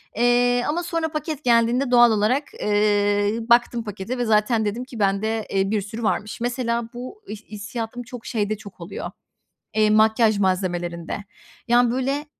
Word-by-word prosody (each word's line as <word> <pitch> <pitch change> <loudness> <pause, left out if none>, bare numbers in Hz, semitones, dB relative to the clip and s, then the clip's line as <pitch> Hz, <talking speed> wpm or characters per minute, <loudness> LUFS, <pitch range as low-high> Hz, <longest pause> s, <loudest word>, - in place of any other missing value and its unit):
Eee, 245 +1 +3
ama 335 +4 -1
sonra 330 -2 -2
paket 305 -1 -4
geldiğinde 240 +2 +2
doğal 240 -1 +7
olarak, 220 +7 +2 0.2
eee, 205 0 +2
baktım 240 0 +3
pakete 210 +3 -5
ve 245 - -1
zaten 220 +1 +2
dedim 215 +4 -2
ki: 250 -3 -10
“Bende, 210 +2 0
eee, 195 0 0
bir 215 -2 +1
sürü 220 +4 -7
varmış.” 215 0 -2
Mesela 235 -1 -1
bu 255 - -8
ih 215 - -6
hissiyatım 225 +3 -5
çok 240 0 -10
şeyde 215 -1 -1
çok 200 -4 -13
oluyor, 170 - -6 0.6
eee, 215 -1 +3
makyaj 220 0 +4
malzemelerinde. 180 -1 -2 0.4
Yani, 240 0 +4
böyle, 270 +4 -1
225 Hz, 155 wpm, -23 LUFS, 205-245 Hz, 0.6 s, doğal